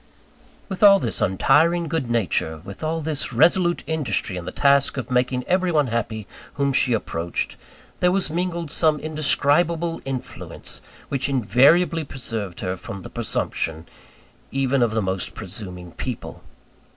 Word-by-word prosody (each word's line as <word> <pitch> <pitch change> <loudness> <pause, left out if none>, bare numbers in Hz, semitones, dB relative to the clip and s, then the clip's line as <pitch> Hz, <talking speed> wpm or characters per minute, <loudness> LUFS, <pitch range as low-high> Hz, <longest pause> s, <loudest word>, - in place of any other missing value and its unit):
With 190 -3 -6
all 200 -1 +9
this 120 - -1
untiring 165 - +3
good 150 -6 -2
nature, 90 -8 0
with 100 +9 -9
all 160 +1 -1
this 150 -2 -3
resolute 175 +7 +3
industry 150 - 0
in 90 -1 -6
the - - -4
task 140 -1 +3
of 130 -1 -5
making 125 0 +1
every 185 0 +1
one 150 -3 +3
happy 110 -2 -2 0.3
whom 140 -1 +1
she 130 -2 +3
approached, 85 -6 -2 0.4
there 180 - +3
was 190 -4 +1
mingled 170 -2 -2
some 155 -2 +2
indescribable 155 +2 +1
influence, 135 -2 -6 0.3
which 140 0 -1
invariably 140 - +4
preserved 115 - -5
her 90 -1 -2
from 95 +1 -8
the - - -9
presumption, 80 0 -2 0.6
even 135 -1 +1
of 115 -2 +1
the 110 - +1
most 95 -1 -2
presuming 90 -2 -6
people. - - -6
135 Hz, 145 wpm, -23 LUFS, 110-165 Hz, 0.6 s, all